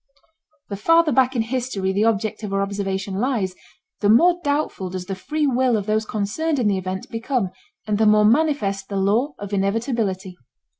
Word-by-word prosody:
The 200 - -4
farther 330 +8 +4
back 260 0 +2
in 230 - +1
history 230 -5 -2
the 205 +3 +2
object 220 -1 0
of 210 -2 -5
our 195 0 +1
observation 195 -1 -3
lies, 225 -7 0 0.5
the 205 - +1
more 345 +11 +5
doubtful 285 - -1
does 180 0 -5
the 195 - -4
free 300 +11 -2
will 255 -3 +2
of 205 - -3
those 215 +1 0
concerned 285 +10 -1
in 240 -5 +1
the 200 -2 +2
event 185 +1 -5
become 230 -4 -1 0.3
and 210 -1 -1
the 220 - +4
more 210 0 +5
manifest 220 -7 +1
the 200 - -4
law 220 +9 +1
of 205 0 -7
inevitability. 200 -2 -1
215 Hz, 185 wpm, -22 LUFS, 195-255 Hz, 0.5 s, more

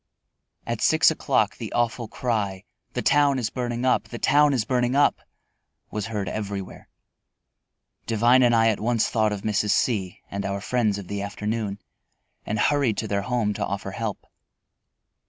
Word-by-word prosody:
At - - -3
six - - +5
o'clock - - 0
the - - -6
awful 120 0 0
cry, 105 -6 -2 0.3
"The - - -2
town 145 -2 +4
is 115 -3 -2
burning 120 -1 -3
up, 130 - +2
the 120 - -8
town 145 +4 +4
is 125 -5 0
burning 125 0 +1
up!" 145 - +3 0.7
was 105 0 -3
heard 105 -4 -3
everywhere. 100 -1 -5 1.2
Devine 120 +3 +4
and 120 -2 +4
I 115 0 +4
at 110 - 0
once 115 0 +1
thought 110 -2 +2
of 100 -2 -4
Mrs. 105 -1 0
C 100 -5 0
and 100 0 -3
our 100 +1 -2
friends 110 -1 0
of 100 -3 -8
the 100 +1 -4
afternoon, 105 0 -3 0.7
and 105 - -1
hurried 135 -2 +2
to 110 - -2
their 100 -1 0
home 115 -1 0
to - - -3
offer 100 0 -4
help. 105 +1 -4
110 Hz, 165 wpm, -24 LUFS, 100-120 Hz, 1.2 s, six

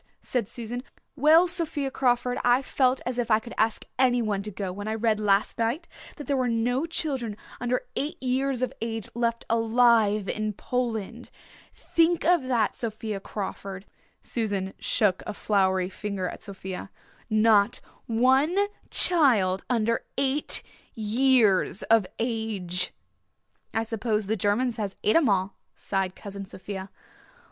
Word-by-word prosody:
said 235 -5 -1
Susan. 240 +1 -5 0.3
"Well, 310 +5 +6
Sophia 325 -6 -1
Crawford, 245 -1 +1
I 245 +2 +4
felt 260 -1 +1
as 250 0 -2
if 240 -1 -1
I 215 - +6
could 235 +2 -8
ask 220 0 0
anyone 240 -6 +2
to 210 - -6
go 195 -2 -4
when 205 +2 -6
I 220 - -1
read 220 -1 +1
last 205 +1 +2
night 240 +9 -1 0.3
that 295 - -8
there 285 - 0
were 255 -2 +1
no 245 +6 0
children 265 -10 -2 0.2
under 245 +1 -1
eight 290 +2 -2
years 260 0 0
of 255 - -1
age 225 -2 -3
left 235 0 -1
alive 225 -3 +3
in 215 0 -2
Poland. 235 0 -3 0.4
Think 335 0 +1
of 350 -1 +5
that, 235 -5 +2
Sophia 220 -2 -4
Crawford" 195 -1 -6 0.4
Susan 200 -5 -2
shook 200 -4 +1
a 210 - -4
floury 190 -3 +1
finger 195 -1 -4
at - - -7
Sophia 190 -2 -7 0.4
"not 215 -2 +4 0.3
one 265 +9 +3 0.3
child 230 - +3
under 230 -2 +1
eight 275 +2 0 0.3
years 220 -3 +3
of 225 -4 +4
age!" 220 -7 -2 0.8
"I 225 - 0
suppose 220 -1 -1
the 215 +3 0
Germans 225 +4 0
has 205 -3 -3
et 215 - +3
'em 320 -7 +5
all," 190 0 0 0.2
sighed 190 -2 -2
Cousin 200 -1 -7
Sophia. 190 0 -7
225 Hz, 140 wpm, -26 LUFS, 205-250 Hz, 0.8 s, Well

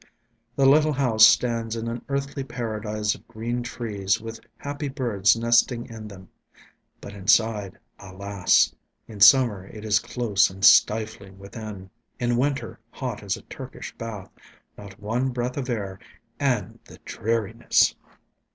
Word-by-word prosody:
The 135 - +2
little 150 +3 +5
house 115 -5 +6
stands 115 -2 +1
in 115 0 -4
an 115 +1 -5
earthly 140 0 -3
paradise 110 -4 -3
of - - -15
green 120 +2 -4
trees 105 -5 -2
with 115 0 -8 0.2
happy 145 +1 -5
birds 115 -7 +2
nesting 120 +1 +2
in 110 -2 -9
them. 95 -3 -12 0.7
But 100 - -10
inside... 105 0 +1 0.2
alas...! 100 0 +1 0.3
In 105 -2 -11
summer, 105 -4 +6
it 110 +1 -10
is 105 0 +3
close 110 -4 +1
and 95 +2 -2
stifling 105 -4 +3
within; 100 -1 -9 0.3
in 120 0 0
winter, 135 +3 -2
hot - - -5
as - - -2
a - - -14
Turkish - - -9
bath, 110 -4 -7 0.4
not 100 -1 -12
one 115 +6 -1
breath 125 0 -3
of 135 -2 -4
air, 100 -5 -4 0.4
and - - -1
the - - -14
dreariness! 115 -2 +1
115 Hz, 140 wpm, -24 LUFS, 100-120 Hz, 0.7 s, house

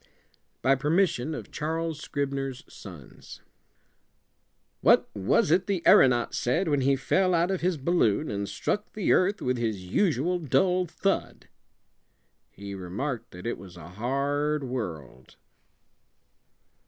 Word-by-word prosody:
By 135 - +5
permission 150 0 +1
of - - -8
Charles 160 0 -3
Scribner's 135 -3 -3
Sons 85 - -12 1.4
"What - - +4
was 100 +8 +2
it 180 +2 +3
the 190 -4 -1
aeronaut 120 -2 +5
said 165 +10 0
when 145 -3 +1
he 135 +1 +3
fell 185 +7 +1
out 170 +3 +2
of 190 - -2
his 180 -1 0
balloon 150 - +1
and 100 -1 -3
struck 210 0 -3
the 210 -4 0
earth 195 +3 +1
with 125 0 0
his 110 -5 -2
usual 170 - +1
dull 180 +4 +1
thud?" 195 +4 -2 1.0
"He 100 +1 -9
remarked 100 +8 -4
that 90 0 -11
it 120 - -3
was 90 -2 -12
a 85 -1 -11
hard 140 +8 -1
world." 85 - -6
140 Hz, 130 wpm, -27 LUFS, 110-170 Hz, 1.4 s, By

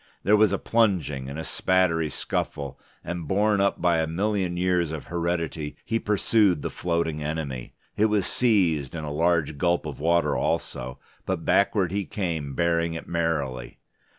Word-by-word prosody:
There 105 - +5
was 105 0 +4
a - - +1
plunging 90 - +1
and 70 - -6
a 80 - -4
spattery 85 -4 +1
scuffle, 70 -2 -3 0.2
and 85 -3 -5
borne 105 +2 +2
up 100 - +1
by 85 -1 +3
a 80 - 0
million 95 +1 -1
years 90 -3 +1
of 80 -2 -5
heredity 85 -3 -2
he 115 - 0
pursued 105 -4 +2
the - - -3
floating 85 -3 -1
enemy. 75 -5 -4 0.2
It 105 - +4
was 105 -3 +2
seized, 85 - +2
and 80 -2 -4
a 75 - -4
large 80 -2 +1
gulp 85 0 +1
of 75 -3 -6
water 80 -2 +2
also, 65 +1 -2 0.3
but 95 -3 -2
backward 100 -3 +2
he 100 0 -1
came 80 -8 -3
bearing 85 0 +1
it 80 - -7
merrily. 75 -7 -2
85 Hz, 165 wpm, -25 LUFS, 75-95 Hz, 0.3 s, There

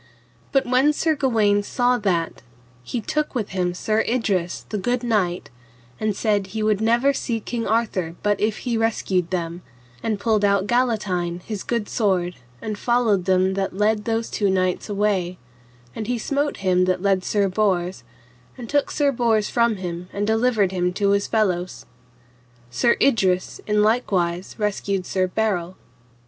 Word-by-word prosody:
But 270 - +2
when 255 +4 +3
Sir 315 +1 +1
Gawaine 220 -7 +2
saw 245 +4 +1
that, 175 -6 -1 0.4
he 230 - -4
took 300 +6 -2
with 220 -5 -2
him 180 -2 -1
Sir 215 +4 0
Idrus 200 -8 -1
the 210 - -2
good 245 +4 -1
knight, 190 - 0 0.5
and 215 -2 0
said 205 -2 0
he 215 +2 -3
would 215 -1 +1
never 240 +5 +3
see 235 -4 -2
King 230 +1 -4
Arthur 200 -7 0
but 205 -1 +1
if 215 +3 -1
he 240 -2 0
rescued 190 -6 0
them, 175 -1 -3 0.4
and 215 -2 -1
pulled 215 0 +1
out 200 -1 +3
Galatine 205 -8 0
his 210 -3 -5
good 235 -3 -2
sword, 185 -6 0 0.3
and 215 -1 -4
followed 230 -6 +2
them 190 0 +2
that 195 -1 -2
led 210 0 +1
those 225 0 -1
two 205 -2 +1
knights 185 +1 0
away; 195 -3 0 0.6
and 215 - -4
he 245 0 0
smote 285 +5 -1
him 180 0 +3
that 185 0 0
led 195 -2 +2
Sir 200 0 +1
Bors, 185 -2 0 0.5
and 245 -2 -7
took 285 +2 +1
Sir 290 -2 +1
Bors 230 -4 +1
from 235 -2 +2
him 180 -1 -6
and 205 +1 -2
delivered 220 -3 +2
him 180 -1 0
to 200 +1 +1
his 200 0 +1
fellows. 185 -5 -1 0.8
And - - -25
Sir 135 - +3
Idrus 190 -9 +2
in 210 0 +3
likewise 185 -6 0
rescued 200 -3 -1
Sir 185 0 0
Berel. 185 -3 -1
205 Hz, 165 wpm, -22 LUFS, 185-230 Hz, 0.8 s, when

